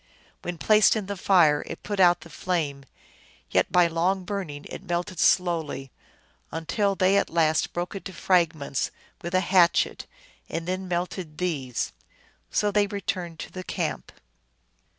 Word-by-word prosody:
When 175 -1 -5
placed 210 +8 +5
in 215 -3 -2
the 200 +1 -4
fire 170 -6 +4
it 165 - -7
put 205 -1 -3
out 175 -2 +5
the 170 - -13
flame, 150 -7 -2 0.7
yet - - +2
by 180 -1 +5
long 175 +3 0
burning 180 -7 -5
it - - -8
melted 175 0 -3
slowly, 160 -7 +1 0.6
until 195 +5 0
they 190 +1 +3
at - - +1
last 160 -1 +2
broke 175 +1 -3
it 195 - -6
to 195 - -6
fragments 160 -8 +1 0.3
with 170 +2 -3
a 185 - +4
hatchet, 175 -2 +3 0.4
and 165 +1 -4
then 185 +1 -2
melted 175 -2 -3
these. 145 -9 -2 0.6
So 210 0 +1
they 205 0 +3
re 200 0 -5
turned 175 -4 -3
to - - -8
the 185 - -6
camp. - - -3
175 Hz, 155 wpm, -26 LUFS, 165-190 Hz, 0.7 s, placed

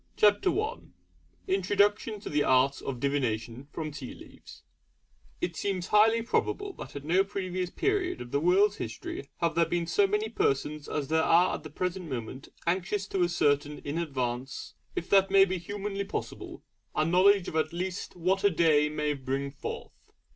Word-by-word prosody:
CHAPTER 210 - +4
I 430 - -2 0.7
INTRODUCTION 210 - +1
TO - - -6
THE 145 0 +2
ART 130 +2 +3
OF 130 -3 -4
DIVINATION 125 -2 -2
FROM 155 0 -4
TEA 140 -3 -8
LEAVES - - -14 0.8
It 170 - -2
seems 190 -1 -2
highly 225 +2 +5
probable 400 - -1
that - - -9
at 140 - -6
no 180 +5 +4
previous 185 -2 -3
period 405 - 0
of 120 0 -8
the 140 - +2
world's 195 +6 +3
history 120 +4 -6
have 170 -1 +2
there 170 -1 +3
been 170 0 -1
so 195 +4 +3
many 210 +2 0
persons 150 -7 -1
as 145 -3 -2
there 160 0 +3
are 170 +3 +4
at - - -4
the 155 - -9
present 180 +2 -3
moment 130 +1 -6 0.2
anxious 185 +3 0
to 190 -2 +1
ascertain 150 -4 +1
in 145 +3 -2
advance, 130 -4 -3 0.2
if 170 - -3
that 195 -1 +5
be 195 -1 +4
humanly 200 +2 -4
possible, 200 - -6 0.3
a 155 - +2
knowledge 185 +3 +4
of - - -5
at 155 -1 +1
least 180 +1 -4
'what 185 +3 0
a 200 - +6
day 155 -4 +3
may 150 0 -1
bring 135 0 -3
forth.' 140 - -8
170 Hz, 170 wpm, -29 LUFS, 145-195 Hz, 0.8 s, a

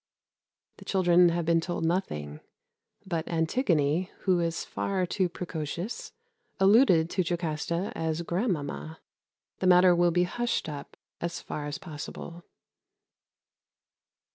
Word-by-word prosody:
The - - -13
children 180 -2 +4
have 170 0 -1
been 165 0 +3
told 175 -1 -3
nothing; 75 - -2 0.7
but 165 -4 -2
Antigone, 165 - +1
who 185 -3 +2
is 165 -1 -1
far 190 -2 -1
too 185 0 0
precocious, 170 - -5 0.5
alluded 195 -4 +5
to 185 - +1
Jocasta 170 +1 -2
as 160 +1 -2
grand 185 +6 0
mamma. 155 +1 -6 0.6
The 185 - +1
matter 180 0 +7
will 175 0 +4
be 175 +1 +2
hushed 240 +2 -1
up 145 -2 -8 0.2
as 170 0 -3
far 145 -1 -5
as 145 - -4
possible. 170 0 -8
170 Hz, 120 wpm, -28 LUFS, 160-185 Hz, 0.7 s, matter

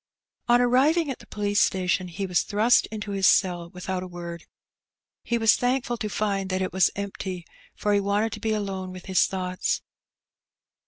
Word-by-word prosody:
On 240 0 +5
arriving 275 +6 +3
at 260 - -6
the - - -15
police 205 -1 0
station 185 0 +1
he 180 +3 -4
was 180 -2 +2
thrust 220 +4 +3
into 210 -1 -6
his 195 -1 +2
cell 175 -3 +2
without 180 +1 -4
a 185 - -6
word. 170 -1 -8 0.8
He 235 - -1
was 225 -2 +5
thankful 245 -1 0
to 215 -3 -3
find 200 -2 -1
that 185 0 0
it 185 - -4
was 190 -1 +4
empty, 190 -3 -5 0.3
for 210 - 0
he 205 - +4
wanted 205 +3 0
to 215 - -6
be 220 0 -1
alone 195 -3 -3
with 185 -1 -10
his 190 -1 +3
thoughts. 185 -1 -2
200 Hz, 180 wpm, -25 LUFS, 185-220 Hz, 0.8 s, On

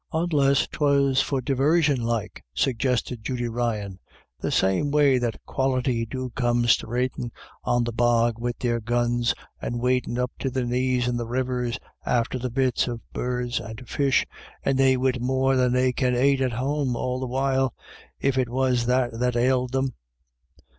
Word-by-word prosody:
" - - -48
Onless 150 -5 +2
'twas 140 -2 +2
for 135 -1 -1
divarsion 145 +1 +2
like," 115 -3 -3
suggested 125 -2 0
Judy 125 -1 -2
Ryan, 110 -5 -2 0.4
"the - - -2
same 95 +10 +2
way 140 -3 +4
that 120 -2 -2
Quality 130 -3 0
do 130 +1 -5
come 120 -1 +1
sthravadin' 120 +1 0 0.3
on 120 0 +2
the 120 - -2
bog 120 -1 +2
wid 120 0 -2
their 120 -2 0
guns, 120 +1 0 0.3
and 120 - -3
wadin' 125 0 0
up 125 0 -1
to 135 - -1
their 130 -1 -2
knees 125 0 +1
in 120 -1 0
the 120 -1 -3
rivers, 125 -1 -1 0.3
after 125 +1 0
the 125 +1 -3
bits 130 0 +1
of 120 -2 -4
birds 125 0 -2
and 110 +2 -9
fish, 140 -2 +2 0.4
and 135 - +1
they 130 -1 +4
wid 130 -1 0
more 130 +1 +2
than 125 -1 +3
they 125 0 +2
can 125 -1 +1
ait 135 +2 +3
at 130 -2 0
home 135 +1 -1
all 125 +1 -2
the 130 - -3
while, 135 0 +1 0.5
if 135 -1 +1
it 125 -2 0
was 125 -1 +1
that 125 -2 +1
that 125 0 +1
ailed 125 +1 +2
them." 135 -1 0
125 Hz, 170 wpm, -25 LUFS, 120-130 Hz, 0.5 s, way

